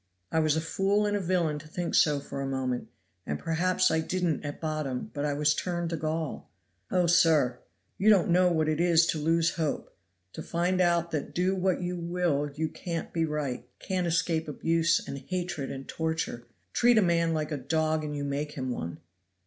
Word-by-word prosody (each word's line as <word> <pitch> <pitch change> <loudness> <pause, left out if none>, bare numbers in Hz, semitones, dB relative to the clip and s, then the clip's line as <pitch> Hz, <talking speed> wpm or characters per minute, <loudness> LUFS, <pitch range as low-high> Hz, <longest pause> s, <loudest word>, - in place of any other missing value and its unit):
I 160 - +2
was 155 -1 +3
a 160 - 0
fool 195 +5 +1
and 205 0 +1
a - - +1
villain 170 -5 0
to 155 - -13
think 175 +2 -4
so 150 -2 +4
for 140 0 -6
a 135 - -2
moment, 130 -2 -2 0.4
and 75 - -3
perhaps 180 - +1
I 160 - +2
didn't 175 -1 -1
at 145 -1 -5
bottom, 155 -5 -3
but 145 0 -2
I 145 - 0
was 150 0 +3
turned 175 0 -2
to - - 0
gall. 155 -1 -3 0.4
"Oh, 180 -1 +2
sir! 160 -7 +4 0.4
you 210 - +4
don't 190 -5 +5
know 180 +1 +4
what 160 -2 +1
it 155 +1 +1
is 170 -1 +5
to 160 - -1
lose 165 +2 +1
hope, 155 -3 -2 0.4
to - - -6
find 180 +2 0
out 170 -1 +2
that 150 -3 -3
do 185 +2 +2
what 185 -1 0
you 180 0 -2
will 170 -4 0
you 160 +1 0
can't 165 0 -5
be 165 -1 +1
right, 145 -5 -3
can't 185 -2 -2
escape 165 -1 0
abuse 165 +3 +1
and 140 0 -5
hatred 175 -2 -3
and 135 -1 -7
torture. 160 -7 -3 0.3
Treat 240 -1 +4
a 215 - +6
man 170 -2 +2
like 155 0 -2
a 150 - -1
dog 155 +3 0
and 150 -1 -4
you 145 - -3
make 145 +1 -3
him 130 -4 -3
one! 85 -8 -4
160 Hz, 205 wpm, -28 LUFS, 150-175 Hz, 0.4 s, a